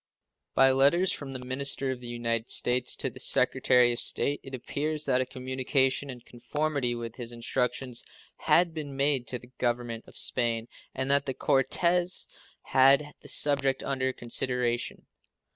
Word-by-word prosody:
By 135 0 +6
letters 145 +8 +3
from 135 -2 -6
the - - -4
minister 135 +1 +1
of 130 - -5
the 125 - -10
United 115 -1 -2
States 125 0 +1
to - - -3
the - - -12
Secretary 125 -1 +3
of 120 - -4
State 145 - -1
it 135 -1 -7
appears 150 +4 -3
that 130 -2 +2
a 130 - -3
communication 130 +1 -1
in 125 -2 -8
conformity 125 +1 -3
with 115 -1 -7
his 120 -2 -6
instructions 125 +1 -1 0.3
had 175 -1 +3
been 145 -4 -6
made 140 -3 +1
to 125 - -3
the 120 +1 -17
Government 120 -1 -2
of - - -15
Spain, 115 -1 0 0.3
and 130 +1 -1
that 140 0 +4
the 135 - -2
Cortes 175 +6 +1 0.4
had 140 +3 +4
the - - -10
subject 135 -2 +2
under 130 -1 -1
consideration. 120 0 -2
130 Hz, 160 wpm, -28 LUFS, 120-140 Hz, 0.4 s, By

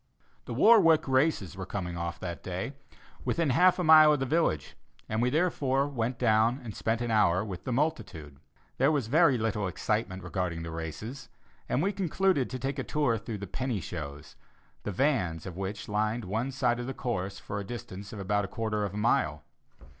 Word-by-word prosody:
The - - -5
"Warwick 180 -11 +6
races" 130 - +1
were 95 -1 -6
coming 90 -4 -4
off 85 0 -4
that 85 -2 -5
day, 95 +9 -4 0.5
within 165 -5 +1
half 180 +7 +5
a 180 - -1
mile 155 -1 +8
of 145 - 0
the 135 - 0
village, 145 - 0 0.3
and 110 +1 -1
we 125 - +3
therefore 140 -3 +1
went 125 -3 -2
down 115 +2 +3
and 110 -4 -7
spent 115 +1 -1
an 120 -1 -1
hour 100 -3 +3
with 95 -5 -7
the 130 - -2
multitude. 110 - -2 0.4
There 135 +3 +4
was 145 -6 0
very 145 +2 +4
little 110 -3 -1
excitement 95 0 -2
regarding 85 -3 -3
the 80 - -6
races, 85 - -6 0.4
and 140 - +1
we 195 - +2
concluded 185 -5 +1
to 130 - -4
take 135 +2 -3
a - - -1
tour 140 -7 0
through 115 -1 -5
the 100 - -6
"penny 120 +3 -3
shows," 75 -4 -7 0.5
the 105 - -4
vans 95 - 0
of 90 -3 -7
which 95 +2 -5
lined 105 +2 -1
one 110 +7 -2
side 125 -3 +1
of 120 - -4
the 135 - -4
course 100 -7 -3
for 100 - -5
the - - -4
distance 100 -3 -8
of 105 - -7
a 105 -1 +1
quarter 110 -1 -2
of 100 0 -3
a - - -4
mile. 75 -9 +1
115 Hz, 195 wpm, -29 LUFS, 95-135 Hz, 0.5 s, mile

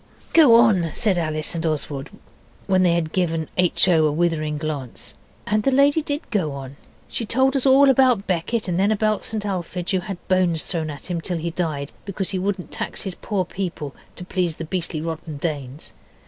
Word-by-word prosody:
'Go 295 -8 +8
on,' 200 -8 +4
said 200 -6 +2
Alice 155 -2 +1
and 165 -1 -3
Oswald, 145 -3 -2 0.6
when 190 -1 +3
they 175 -2 +4
had 160 -2 -1
given 165 -4 0
H. 180 0 +3
O. 160 -4 +4
a - - +1
withering 155 -2 0
glance. 145 -5 -4 0.3
And 215 +1 +1
the 240 - +2
lady 280 +4 +4
did 290 0 -4
go 170 -9 0
on. 135 0 -8 0.3
She - - -3
told 260 +5 +2
us 270 0 +2
all 275 +1 +7
about 255 -6 +4
Becket, 190 +5 -1
and 175 0 0
then 200 +2 +3
about 215 0 +1
St 215 -2 -3
Alphege, 180 -1 -3
who 190 - +2
had 190 -1 -7
bones 180 -4 +2
thrown 160 -3 -2
at 145 +5 -7
him 170 -1 -2
till 175 +1 -2
he 170 +1 -3
died, 155 -5 -3
because 195 -1 -3
he 190 - -1
wouldn't 190 -1 -3
tax - - -3
his 190 - -3
poor 190 0 -2
people 170 -6 -5 0.2
to 180 - -8
please 180 -3 -1
the 165 - -6
beastly 165 -2 -3
rotten 160 -2 -5
Danes. 145 -3 -5
180 Hz, 200 wpm, -22 LUFS, 160-205 Hz, 0.6 s, Go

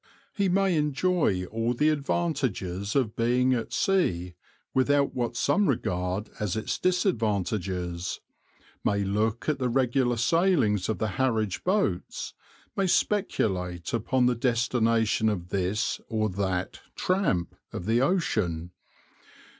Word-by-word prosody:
He 200 -2 +1
may 190 0 +2
enjoy 150 - +1
all 115 +2 0
the 150 +5 +3
advantages 135 - -1
of 125 -6 +1
being 125 +2 +2
at 115 -2 -2
sea 90 - +1 0.4
without 140 +2 +2
what 120 -1 -2
some 205 +10 +2
regard 90 -4 -1
as 105 -4 -1
its 110 - -2
disadvantages, 100 - -1 0.6
may 100 0 +1
look 105 +3 -1
at 150 -3 +1
the 125 -1 0
regular 125 -1 +1
sailings 125 - +2
of 110 - 0
the 110 - -1
Harwich 110 -7 0
boats, 185 - -1 0.4
may 195 -1 +1
speculate 95 - 0
upon 125 +3 +1
the 125 - +4
destination 115 -2 +1
of 90 -4 -3
this 100 +3 -1
or 110 -1 0
that 95 -1 -2 0.2
"tramp" 180 - 0 0.2
of 90 - -6
the 115 +3 +2
ocean. 105 - 0
115 Hz, 120 wpm, -27 LUFS, 95-140 Hz, 0.6 s, the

